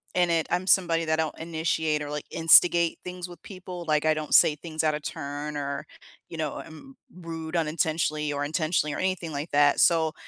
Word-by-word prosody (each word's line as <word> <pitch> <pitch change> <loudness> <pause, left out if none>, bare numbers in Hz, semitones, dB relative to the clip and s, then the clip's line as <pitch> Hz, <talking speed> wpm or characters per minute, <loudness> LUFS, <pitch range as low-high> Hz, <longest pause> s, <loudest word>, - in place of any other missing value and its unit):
and 175 -1 +2
it 165 -1 0
I'm 180 +1 -1
somebody 170 -4 +3
that 155 - 0
I 160 - +3
don't 155 - -6
initiate 160 -2 -1
or, 145 - -5
like, 150 0 -5
instigate 170 +1 +5
things 180 0 -7
with 175 - -13
people, 185 -3 -9
like, 150 0 +1
I 155 - +4
don't 155 -1 -5
say 150 - +6
things 160 0 -5
out 155 -1 +1
of 150 - -6
turn 145 +1 -6
or, 140 +1 -4 0.4
you 165 - -8
know, 155 -3 -3
I'm 260 - -11 0.2
rude 165 -1 -7
unintentionally 155 -1 -1
or 145 0 -2
intentionally 155 0 -1
or - - -5
anything 185 -3 -2
like 145 +2 -5
that. 145 0 +3
So 160 -2 +3
160 Hz, 205 wpm, -26 LUFS, 150-170 Hz, 0.4 s, say